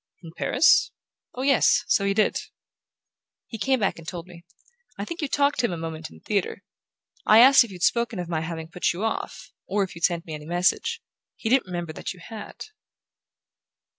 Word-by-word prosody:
"In 165 - -10
Paris? 270 +6 +4 0.5
Oh, 255 - -4
yes...So 265 -6 +3
he 200 0 +1
did." 215 - +2 1.1
"He 225 - -8
came 260 +5 +1
back 195 -5 -1
and 165 - -13
told 170 -2 -6
me. 175 -2 -14 0.5
I - - -4
think 335 -1 -6
you 295 - -1
talked 280 0 +1
to 245 - +2
him - - -5
a 170 - -4
moment 160 -1 -6
in 80 - -15
a - - -18
theatre. 200 -3 -2 0.6
I 215 - +7
asked 260 +2 +8
if 235 - -9
you'd 180 -3 -8
spoken 235 -2 +1
of 175 -1 -4
my 165 -2 -2
having 160 0 -5
put 175 +2 -1
you 180 +5 -5
off 225 - -4 0.2
or 200 +1 +1
if 185 -2 -6
you'd 170 - -11
sent 170 0 +1
me 160 - -7
any 150 0 -8
message. 175 +2 0 0.3
He 220 - -4
didn't 255 -4 +3
remember 175 -3 -5
that - - -5
you - - -16
had." 215 +5 -9
185 Hz, 200 wpm, -25 LUFS, 170-235 Hz, 1.1 s, asked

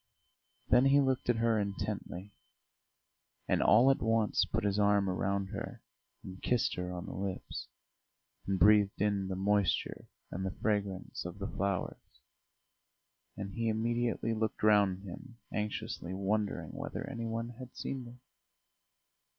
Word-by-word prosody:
Then 125 - +5
he 140 +1 +6
looked 130 -3 +1
at 120 - +5
her 115 -1 +2
intently, 100 -1 -4 1.1
and - - +2
all 125 +5 +6
at 135 - 0
once 115 -2 +2
put - - -2
his 100 0 +1
arm 100 -1 +4
round 95 +1 0
her 100 -1 -6 0.4
and 95 0 -9
kissed 125 -2 +1
her 90 0 -3
on 90 -1 -5
the - - -6
lips, 95 -1 -4 0.8
and 95 -1 +1
breathed 105 +2 +5
in 100 -2 +1
the 95 - -2
moisture 100 +1 +1 0.2
and 95 - -3
the 95 0 -4
fragrance 100 -3 -1
of 90 +2 -7
the 100 -1 -4
flowers; 100 -2 -2 1.4
and 100 0 -5
he 115 +3 -1
immediately 115 0 0
looked 110 -1 -2
round 100 -3 +4
him, 115 +6 -9 0.2
anxiously 105 -3 -3
wondering 100 +2 -1
whether - - -5
any 115 -1 -4
one 115 +1 -3
had 125 -1 -9
seen 130 -2 -4
them. 120 +1 -13
105 Hz, 140 wpm, -32 LUFS, 95-115 Hz, 1.4 s, he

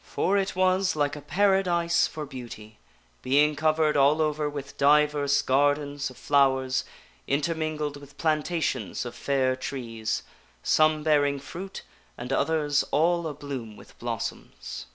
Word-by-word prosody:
For 195 - 0
it 195 -1 0
was 185 0 +2
like 145 -1 0
a 150 - -8
Paradise 180 -2 +2
for 155 -1 -6
beauty, 120 -5 -10 0.4
being 145 +3 +3
covered 155 0 +2
all 145 +2 +4
over 150 -1 0
with 140 -1 -7
divers 145 0 +3
gardens 145 +1 +1
of 130 - -14
flowers, 135 -2 +2 0.4
inter 145 +4 +1
mingled 155 -2 -3
with 145 0 -15
plantations 155 - -1
of 120 - -6
fair 130 -1 0
trees, 115 -4 -4 0.4
some 155 -1 +3
bearing 145 -2 +3
fruit 185 +7 -8 0.3
and 125 +2 -4
others 150 -1 +1
all 170 +2 +2
a 150 - -4
bloom 130 -7 -7
with - - -16
blossoms. - - -6
145 Hz, 135 wpm, -26 LUFS, 135-155 Hz, 0.4 s, all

